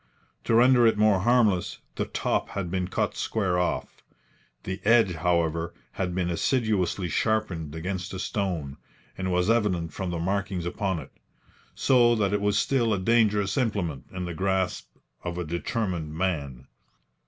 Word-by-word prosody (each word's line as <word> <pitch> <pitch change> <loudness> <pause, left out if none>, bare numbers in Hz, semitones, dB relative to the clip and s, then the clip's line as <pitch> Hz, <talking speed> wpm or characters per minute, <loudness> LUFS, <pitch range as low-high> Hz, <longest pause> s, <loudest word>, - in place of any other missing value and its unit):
To 115 - +2
render 120 0 +6
it 110 - +2
more 105 -2 +4
harmless, 110 -4 +2 0.2
the - - -2
top - - -1
had 90 -4 -4
been 90 -1 -1
cut - - -1
square 95 -5 0
off. 90 - -2 0.6
The 95 +2 -5
edge, 115 -4 +4
however, 85 0 0 0.2
had 90 -2 -3
been 90 -2 0
assiduously 100 -2 0
sharpened 90 -8 -1
against 90 +3 -4
a - - -3
stone, 90 -8 -3 0.4
as 95 - -3
was 90 0 +1
evident 95 -8 0
from 95 -2 -3
the 85 - -2
markings 95 0 -2
upon 95 +1 -1
it, 75 - -8 0.6
so 120 -3 +4
that 100 -3 +1
it 105 - +1
was 105 0 +1
still 120 -5 +2
a - - -3
dangerous 105 -1 +2
implement 100 - -1
in 90 -1 -4
the 85 - -4
grasp 95 +1 -1 0.4
of 85 0 -4
a 90 - -2
determined 85 -2 -3
man. 70 -8 -2
95 Hz, 155 wpm, -26 LUFS, 85-105 Hz, 0.6 s, render